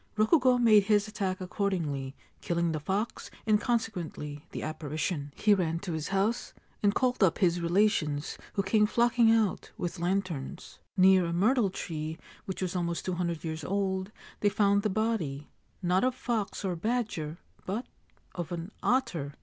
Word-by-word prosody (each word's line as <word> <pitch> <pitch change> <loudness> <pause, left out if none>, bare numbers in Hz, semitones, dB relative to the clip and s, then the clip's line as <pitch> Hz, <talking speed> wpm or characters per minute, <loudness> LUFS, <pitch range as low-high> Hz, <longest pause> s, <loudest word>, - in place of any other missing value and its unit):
Rokugo 250 +3 +4
made 215 -4 +6
his 205 -1 +3
attack 195 -3 -2
accordingly, 170 -8 -2 0.3
killing 170 -1 0
the 155 - -2
fox 195 +9 -2 0.2
and 215 -1 +3
consequently 170 -10 -3
the - - -6
apparition. 155 -1 -3
He 210 - +4
ran 165 -4 +1
to 190 - -4
his 155 -1 -3
house, 200 +5 0 0.3
and 205 0 +3
called 255 -2 +1
up 170 -3 +4
his 175 -2 +2
relations, 170 -5 +1 0.2
who 195 - 0
came 210 +2 +3
flocking 235 0 +4
out 220 -4 +1
with 175 0 -4
lanterns. 175 -6 -3 0.2
Near 185 -1 +6
a 170 - -2
myrtle 215 +4 +3
tree 160 -3 -5 0.3
which 190 0 -4
was 185 0 -2
almost 170 -1 -2
two 185 - -1
hundred 170 -2 -2
years 160 0 -4
old, 190 0 -1 0.3
they 205 - +3
found 200 0 +3
the 215 - 0
body 190 -10 -1
— - - -39
not 180 +2 +2
of 255 0 +2
fox 220 -5 -2
or 185 -2 0
badger, 200 -6 -2 0.3
but 210 +7 -2 0.3
— - - -35
of 175 -1 -5
an 170 +3 -5
otter. 180 - 0
190 Hz, 165 wpm, -29 LUFS, 170-215 Hz, 0.3 s, made